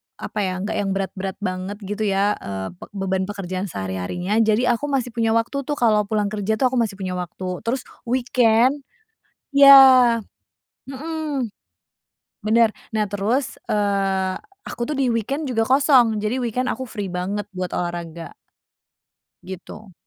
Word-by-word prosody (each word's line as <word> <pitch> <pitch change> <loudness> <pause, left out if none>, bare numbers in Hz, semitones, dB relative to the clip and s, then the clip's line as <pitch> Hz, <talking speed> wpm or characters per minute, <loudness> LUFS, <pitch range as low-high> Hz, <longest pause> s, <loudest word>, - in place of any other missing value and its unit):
apa 210 - -6
ya, 190 -2 0
nggak 205 - -3
yang 200 -1 -1
berat-berat 195 0 -4
banget 185 +2 -3
gitu 210 +2 -3
ya, 200 +1 +2
eee, 95 -1 -5
be - - -9 0.2
beban 190 0 -1
pekerjaan 195 -1 -4
sehari-harinya. 100 - -2
Jadi 220 +2 +3
aku 245 +4 +1
masih 265 -4 -1
punya 225 -1 +1
waktu 255 +4 -1
tuh 295 - -1
kalau 215 -5 +2
pulang 210 -1 0
kerja 215 +1 -1
tuh 250 +3 +1
aku 255 - +1
masih 220 -4 0
punya 190 -1 -4
waktu 180 +1 -5
terus 255 +2 -1 0.2
weekend 250 +2 +2 0.7
ya, 270 -4 +8 0.8
mhm. 295 -3 -3 1.0
Bener. 225 +1 +4 0.2
Nah 215 -1 0
terus, 210 +7 -1 0.2
eee, 195 -2 0 0.3
aku - - -7
tuh 295 +5 -2
di 265 - +2
weekend 270 +7 -2
juga 225 -3 +1
kosong 260 -5 +4
jadi 235 +5 -1
weekend 250 +2 -1
aku 260 - -4
free 210 -5 -5
banget 190 +3 -3
buat 185 -1 -3
olahraga. 170 -1 -5 1.1
Gitu. 190 +2 -10
215 Hz, 145 wpm, -22 LUFS, 190-250 Hz, 1.1 s, ya